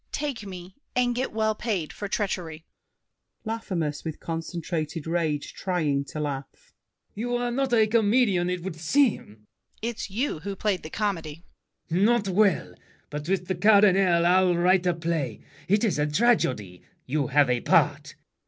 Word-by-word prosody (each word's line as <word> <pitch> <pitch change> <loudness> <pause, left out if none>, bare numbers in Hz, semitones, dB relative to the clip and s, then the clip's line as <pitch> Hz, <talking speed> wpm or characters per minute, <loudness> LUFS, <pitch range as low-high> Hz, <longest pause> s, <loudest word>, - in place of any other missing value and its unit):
Take 275 -8 -3
me, 185 -1 -9 0.2
and 245 -1 +2
get 255 +2 -2
well 220 0 +1
paid 205 -8 -3
for 205 - -5
treachery. 175 -6 -3 0.8
LAFFEMAS 185 -9 -3
(with 160 -2 -5
concentrated 165 -1 -4
rage, 160 -3 -1
trying 150 -7 -1
to 155 - -7
laugh). 140 -2 -6 0.4
You 245 +4 -2
are 245 0 -1
not 265 +1 -1
a 225 -2 +5
comedian, 215 -4 +2
it 180 -1 -3
would 190 -3 -5
seem! 235 - +2
DIDIER. 105 - -17 0.5
It's 230 -2 -3
you 220 - -2
who 200 +4 -5
played 195 -2 -1
the 155 - -8
comedy. 165 -6 -3 0.5
LAFFEMAS. 180 +4 +2
Not 225 -2 +3
well. 195 -1 +2 0.4
But 150 +2 -5
with 190 -2 0
the 185 - -1
Cardinal 190 -3 +4
I'll 180 0 +4
write 180 +1 +3
a 175 - +2
play. 165 -8 -2 0.3
It 205 +4 +2
is 205 -9 +1
a 150 - +2
tragedy: 140 - +1 0.2
you 140 0 -1
have 145 +1 +4
a 125 -1 +1
part. - - +2
180 Hz, 160 wpm, -26 LUFS, 160-215 Hz, 0.8 s, a